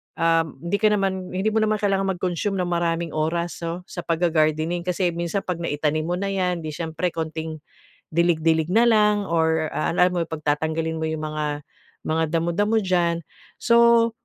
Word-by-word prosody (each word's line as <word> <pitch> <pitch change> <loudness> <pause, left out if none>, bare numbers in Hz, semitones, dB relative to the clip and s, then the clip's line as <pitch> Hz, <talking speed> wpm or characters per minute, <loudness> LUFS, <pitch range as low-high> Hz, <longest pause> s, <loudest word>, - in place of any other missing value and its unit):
uhm 165 -2 +1
hindi 170 +4 -1
ka 215 0 +4
naman 190 -3 -1
hindi 190 +3 -1
mo 220 - +2
naman 215 0 +2
kailangan 195 -1 +1
mag-consume 180 +2 -2
ng 180 - 0
maraming 170 -1 -1
oras 170 +2 -1
so, 170 +2 -4
sa - - -8
pag-gagardening. 165 0 +1
Kasi 180 0 0
minsan 170 +3 -1
'pag 180 -2 -3
naitanim 155 0 0
mo 175 - 0
na 200 - -2
'yan, 180 -2 0
hindi 155 - -4
siyempre 165 +2 -2
konting 160 -1 -4 0.5
dilig, 170 0 +2
dilig 160 -1 +2
na 230 +4 +5
lang 210 -2 +4
or 160 -1 +1
a - - 0
lam 180 0 +3
mo 175 - +1
pagtatanggalin 160 +1 -1
mo - - -3
'yong 160 -1 -3
mga 155 0 -2 0.6
mga 160 +1 +1
damo, 165 +1 0
damo 210 +3 +2
diyan. 175 -4 +1 0.4
So, 235 -1 +5
170 Hz, 175 wpm, -23 LUFS, 160-190 Hz, 0.6 s, na